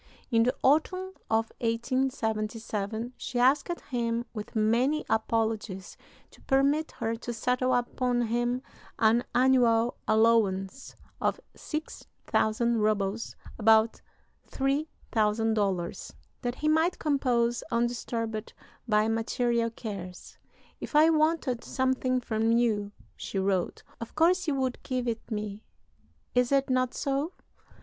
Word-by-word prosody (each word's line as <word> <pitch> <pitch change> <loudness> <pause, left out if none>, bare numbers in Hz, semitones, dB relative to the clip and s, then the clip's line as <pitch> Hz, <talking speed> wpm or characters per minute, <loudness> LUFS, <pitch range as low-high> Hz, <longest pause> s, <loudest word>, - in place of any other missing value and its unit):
In 230 -1 +4
the 245 +2 +2
autumn 370 +7 +2 0.2
of 225 0 +1
1877 225 -2 -2
she 245 - -5
asked 265 +7 +3 0.2
him, 235 -1 -1
with 210 -1 -7
many 240 +8 +2
apologies, 220 -3 -1 0.4
to - - -19
permit 280 +3 +2
her 225 +1 -2
to 240 - -5
settle 250 +2 0
upon 245 0 0
him 240 +2 -1 0.3
an 230 +2 +4
annual 245 -2 +4
allowance 220 0 +2 0.3
of - - +1 0.2
6000 235 -6 -2
rubles 210 0 0 0.2
(about 220 0 +4 0.5
$3000), 220 - -1 0.3
that 245 -1 -2
he 305 - -2
might 320 +3 +3
compose 245 -5 +1
undisturbed 230 -2 -2 0.3
by 215 -1 +3
material 230 +1 0
cares. 195 -6 -8 0.4
"If - - -7
I 315 +2 +7
wanted 310 -6 +1
something 260 -1 0
from 225 -1 0
you," 220 -4 +1 0.2
she - - -5
wrote, 190 -2 0 0.2
"of 230 - -8
course 345 +3 +3
you 295 - +1
would 260 -2 -1
give 255 -1 -2
it 230 0 -3
me 210 -2 -4 0.7
is 250 0 +2
it 275 -1 +2
not 255 -1 +1
so? 285 +5 -1
235 Hz, 115 wpm, -28 LUFS, 220-260 Hz, 0.7 s, I